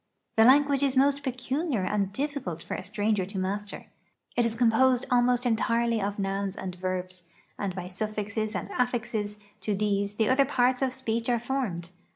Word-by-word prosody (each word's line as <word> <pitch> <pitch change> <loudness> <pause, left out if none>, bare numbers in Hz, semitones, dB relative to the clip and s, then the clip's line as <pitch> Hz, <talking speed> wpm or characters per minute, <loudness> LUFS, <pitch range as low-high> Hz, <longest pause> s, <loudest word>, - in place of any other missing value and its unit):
The 225 - +6
language 280 +2 +5
is 275 -2 +2
most 280 +1 +4
peculiar 260 - -1
and 200 0 0
difficult 265 - -3
for - - -5
a - - -3
stranger 205 +1 0
to 200 0 -7
master. 200 +2 -3 0.5
It 240 -1 +3
is 225 - -3
composed 245 +2 +3
almost 245 0 +3
entirely 230 -1 +1
of 200 +1 -2
nouns 195 0 -2
and 185 -2 -5
verbs, 185 0 -4 0.3
and 195 -3 -2
by 180 -1 -5
suffixes 210 +2 -3
and - - -4
affixes 225 -4 -1 0.2
to 210 - -1
these 200 0 0
the 220 0 +2
other 265 +2 +4
parts 255 -1 +2
of 265 -1 +2
speech 235 -2 -2
are 240 - +3
formed. 220 -9 -3
220 Hz, 175 wpm, -28 LUFS, 200-255 Hz, 0.5 s, The